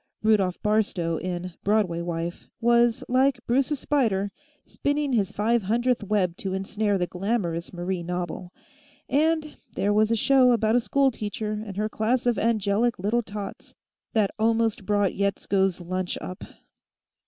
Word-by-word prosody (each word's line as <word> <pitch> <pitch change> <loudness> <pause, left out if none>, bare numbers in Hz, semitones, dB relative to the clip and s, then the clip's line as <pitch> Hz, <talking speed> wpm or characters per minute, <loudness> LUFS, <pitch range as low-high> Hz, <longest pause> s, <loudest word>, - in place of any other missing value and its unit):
Rudolf 200 -5 +2
Barstow, 200 -6 +1
in 180 0 -4
"Broadway 200 -5 +1
Wife," 170 0 -4
was, 235 0 +3
like 260 +1 +2
Bruce's 275 +5 +1
spider, 205 -9 +1 0.3
spinning 285 -1 -1
his 205 -4 +1
five 225 +3 +1
hundredth 235 +4 +1
web 195 -4 0
to 190 -1 -3
ensnare 205 +1 0
the 180 - 0
glamorous 180 -3 -2
Marie 180 0 -3
Knobble. 175 0 -4 0.6
And 310 +1 +1 0.2
there 205 +1 +1
was 215 +1 +3
a 230 - +2
show 255 +2 +5
about 220 -1 +2
a - - +5
schoolteacher 220 -3 0
and 200 -3 -8
her 210 +1 0
class 230 +4 0
of 240 -2 +2
angelic 220 +1 +1
little 210 +6 +1
tots 205 -2 -8 0.4
that 215 -3 +2
almost 225 -2 +1
brought 205 -2 +2
Yetsko's 195 -1 0
lunch 185 +1 -3
up. 185 - -7
210 Hz, 140 wpm, -25 LUFS, 185-235 Hz, 0.6 s, show